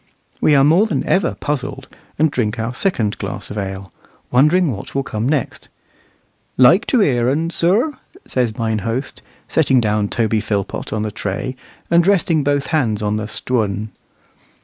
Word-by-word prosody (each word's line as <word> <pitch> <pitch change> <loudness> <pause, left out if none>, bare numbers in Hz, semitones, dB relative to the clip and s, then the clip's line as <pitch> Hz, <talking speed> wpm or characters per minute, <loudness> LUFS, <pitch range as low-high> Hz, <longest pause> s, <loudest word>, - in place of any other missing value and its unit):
We 150 - +4
are 135 - +5
more 170 +9 +4
than 155 -10 -1
ever 190 -3 +1
puzzled, 135 -2 -4 0.3
and 155 0 +3
drink 115 -4 -1
our 115 +2 -3
second 120 - -1
glass - - -5
of 105 - -6
ale, 95 -2 -6 0.4
wondering 150 +6 +4
what 100 +2 -8
will 135 - +1
come 110 0 -2
next. 150 -4 -2 0.9
"Like 165 - +5
to 250 - +3
hear 125 -9 +2
un, 160 +5 0
sir?" 205 - +2 0.3
says 120 -4 -1
mine 110 -2 -1
host, 115 +5 -4 0.3
setting 135 -5 +3
down 105 -2 0
Toby 110 -2 0
Philpot 100 -2 -3
on 110 -1 -1
the 110 - -3
tray, 105 +5 -4 0.4
and 170 +1 +4
resting 170 -6 +2
both 145 0 +1
hands 110 -9 +1
on 105 0 0
the 110 -1 -4
"Stwun." 110 -3 -2
125 Hz, 165 wpm, -19 LUFS, 110-155 Hz, 0.9 s, are